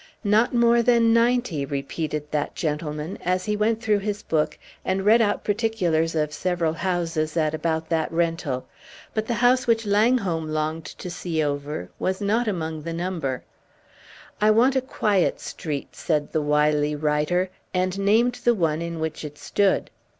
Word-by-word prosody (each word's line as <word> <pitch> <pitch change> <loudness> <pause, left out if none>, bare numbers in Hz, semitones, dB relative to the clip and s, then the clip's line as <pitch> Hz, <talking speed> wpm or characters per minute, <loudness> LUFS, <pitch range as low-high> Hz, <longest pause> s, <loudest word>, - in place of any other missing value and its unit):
"Not 215 +3 +3
more 235 -1 +4
than 235 -1 +4
ninety," 230 - +2
repeated 150 +2 -4
that 150 -1 -2
gentleman, 150 0 -3
as 185 +1 0
he 210 -1 0
went 220 +2 0
through 210 -3 +2
his 205 +1 -3
book, 155 -2 0 0.3
and 190 +1 -1
read 225 +3 +6
out 205 -2 +1
particulars 185 -7 0
of 150 -1 0
several 175 -2 0
houses 165 -3 -1
at 155 -1 +1
about 160 0 -1
that 160 -1 0
rental; 165 -6 -1 0.5
but 220 0 -2
the 235 - 0
house 250 +2 +3
which 225 -1 +2
Langholm 200 -7 +2
burned 155 +1 -2
to 180 - -7
see 165 -2 -2
over 145 -9 -3
was 190 0 -1
not 220 +3 +1
among 160 -5 -2
the 165 +2 -5
number. 165 -7 -3 1.0
"I 210 - +5
want 240 +5 +4
a 265 - +3
quiet 210 -7 +1
street," 145 -4 -5
said 150 -3 -1
the 155 - 0
wily 150 0 +2
writer, 150 +5 0 0.2
and 185 +1 -1
named 225 +5 +3
the 240 -1 +4
one 165 -4 0
in 170 -1 -4
which 160 0 -3
it 150 -1 -7
stood. 200 -1 +1
175 Hz, 165 wpm, -24 LUFS, 155-215 Hz, 1.0 s, read